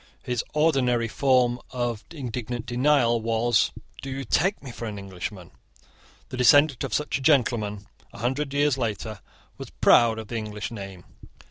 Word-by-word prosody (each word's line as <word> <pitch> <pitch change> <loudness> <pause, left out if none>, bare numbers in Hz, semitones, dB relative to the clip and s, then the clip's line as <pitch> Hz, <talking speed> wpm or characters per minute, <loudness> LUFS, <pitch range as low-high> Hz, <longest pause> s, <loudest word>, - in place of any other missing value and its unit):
His 125 -2 -2
ordinary 130 -7 +2
form 125 0 +2
of 120 -3 -3
indignant 120 -5 -5
denial 125 -2 +2
was 115 +1 +2 0.3
"Do 135 - -6
you 135 +1 -4
take 180 - +1
me 130 - -7
for 115 - -7
an 105 -2 -5
Englishman?" 95 -1 -7 0.8
The 130 - -6
descendant 140 +2 +5
of - - -4
such 150 -2 -1
a - - -9
gentleman 115 -8 +1 0.3
a - - -13
hundred 130 +5 -2
years 140 -1 +1
later 110 -2 -3 0.4
was - - -7
proud 115 -2 +4
of 110 -1 -7
the 115 - -3
English 105 -1 -5
name. 100 -5 -8
120 Hz, 155 wpm, -25 LUFS, 110-135 Hz, 0.8 s, descendant